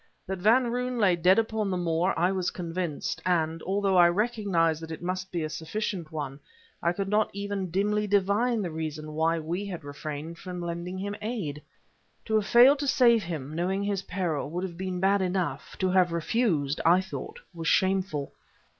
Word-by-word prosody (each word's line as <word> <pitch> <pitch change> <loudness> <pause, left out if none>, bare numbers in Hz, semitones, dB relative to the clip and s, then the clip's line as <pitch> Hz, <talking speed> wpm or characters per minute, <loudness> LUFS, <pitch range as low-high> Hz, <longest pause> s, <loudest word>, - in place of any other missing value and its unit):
That 190 0 -4
Van 235 +5 +4
Roon 250 +1 -2
lay 195 -6 +4
dead 180 +3 +4
upon 220 -2 0
the 185 - -1
moor 175 +1 +1
I 175 +3 +3
was 185 -2 0
convinced; 170 -3 -4
and 165 -2 0
although 195 0 +1
I 175 -1 +7
recognized 185 -6 +1
that 160 - -7
it 160 +1 -7
must 185 +1 -3
be 170 -2 -2
a - - -1
sufficient 175 0 -4
one 145 -3 -5 0.4
I 170 - +2
could 195 +2 -3
not 210 +2 +2
even 200 -2 -3
dimly 210 +4 0
divine 205 +3 +2
the 175 - -3
reason 155 -1 -5
why 165 +2 +1
we 165 +5 -3
had 180 -6 -6
refrained 150 +3 -6
from 180 -1 -6
lending 170 +1 -4
him 200 +2 -4
aid. 200 -11 -4 0.6
To 220 - -3
have 215 -2 +2
failed 260 +4 +7
to 285 - -2
save 240 -4 +5
him, 155 -5 -5
knowing 185 +4 -1
his 200 -1 -1
peril, 170 -7 -2
would 175 +4 -3
have 180 -3 -5
been 185 0 -3
bad 195 +1 +3
enough; 185 -1 -2
to 185 -1 +1
have 180 -2 +4
refused, 165 - 0
I 175 +3 +6
thought 190 - -6
was 165 -1 -5
shameful. 190 -7 +1
185 Hz, 190 wpm, -27 LUFS, 165-200 Hz, 0.6 s, I